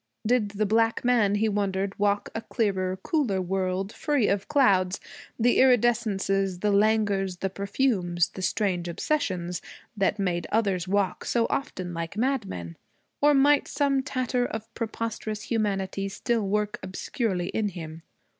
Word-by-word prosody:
Did 230 -2 +2
the 215 - +2
black 225 +3 +2
man, 225 -5 +3
he 220 +2 +2
wondered, 200 -1 -1
walk 205 0 +1
in - - -2
a - - -9
clearer, 190 -5 -1
cooler 255 - +1
world, 190 +2 -1
free 290 -8 +1
of 200 - +2
the 195 - -21
clouds, 195 -9 +3 0.4
the 240 +1 +3
iridescences, 205 -7 +2
the 210 - +2
languors, 200 -3 +2
the 195 +1 -2
perfumes, 195 -4 0
the 190 - -8
strange 185 -2 0
obsessions, 180 - -1 0.3
that 205 +1 +1
made 180 -4 -1
others 195 -5 +1
walk 195 -1 0
so 235 -1 +2
often 185 -10 -3
like 170 +3 -5
madmen? 205 - -2 0.4
Or 295 0 +5
might 285 +1 +4
some 275 -2 +1
tatter 255 -2 -1
of 220 0 -7
preposterous 220 -2 -4
humanity 195 -3 -1
still 225 +1 -1
work 210 +1 -1
obscurely 190 0 -2
in 215 -2 -1
him? 165 -3 -8
205 Hz, 145 wpm, -26 LUFS, 190-230 Hz, 0.4 s, Or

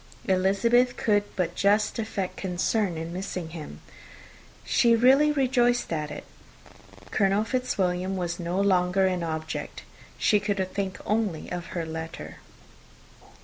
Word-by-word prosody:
Elizabeth 200 +7 +3
could 205 -2 +2
but 180 -3 -1
just 210 +3 +2
affect 200 -4 -3
concern 185 0 -1
in 165 +1 -5
missing 180 -2 -4
him; 160 -2 -9 0.8
she 235 -1 +4
really 265 +6 +5
rejoiced 245 - +2
at 150 -2 -2
it. - - -7 0.9
Colonel 200 0 +2
Fitzwilliam 190 -7 -1
was 175 -1 -3
no 175 +2 -2
longer 190 -1 +3
an 185 -2 0
object. 160 -1 -4 0.3
She 210 - +3
could 205 -1 -1 0.2
think 195 -2 -2
only 210 -7 -1
of 175 -1 -4
her 165 - -1
letter. 160 0 -7
195 Hz, 125 wpm, -26 LUFS, 175-220 Hz, 0.9 s, really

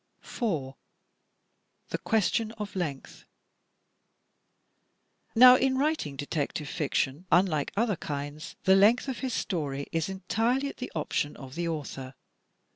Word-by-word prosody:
4, 155 - -3 1.1
The - - -3
Question 220 0 +1
of 210 -3 -7
Length 155 -8 -5 2.1
Now, 250 +2 +10
in 260 0 +2
writing 285 - 0
detective 145 +1 -3
fiction, 150 +2 -1
unlike 170 -6 +3
other 215 -4 +1
kinds, 145 +2 -6
the 190 - +6
length 215 +7 +5
of 260 -3 -3
his 260 -3 -2
story 140 -6 -2
is 165 +2 -1
entirely 225 +8 0
at - - -10
the 250 - -6
option 150 -1 -2
of 130 -2 -10
the 170 +2 -2
author. 135 -5 -5
175 Hz, 120 wpm, -28 LUFS, 145-230 Hz, 2.1 s, Now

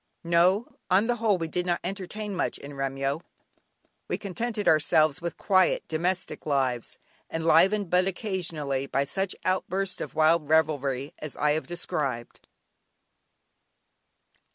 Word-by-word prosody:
No! 175 +6 +2
On 190 +4 +4
the 240 0 0
whole 215 -4 +2
we 165 -2 -3
did 180 +2 -2
not 175 -1 +1
"entertain" 200 +2 -5
much 180 - -1
in 145 +1 -10
Remyo; 135 +2 -2 0.9
we - - -1
contented 210 +3 -3
ourselves 155 0 +4
with 170 0 -4
quiet, 185 -2 +2
domestic 175 +1 -2
lives, 130 -5 0 0.3
enlivened 165 +5 +3
but 180 +1 +3
occasionally 165 - -2
by 135 0 +1
such 190 +6 -2
outbursts 185 0 -1
of - - -6
wild 155 -1 +3
revelry 145 -4 +1
as 155 -2 -7
I 150 - +2
have 155 +1 -1
described. 145 -8 -4
170 Hz, 130 wpm, -27 LUFS, 145-190 Hz, 0.9 s, On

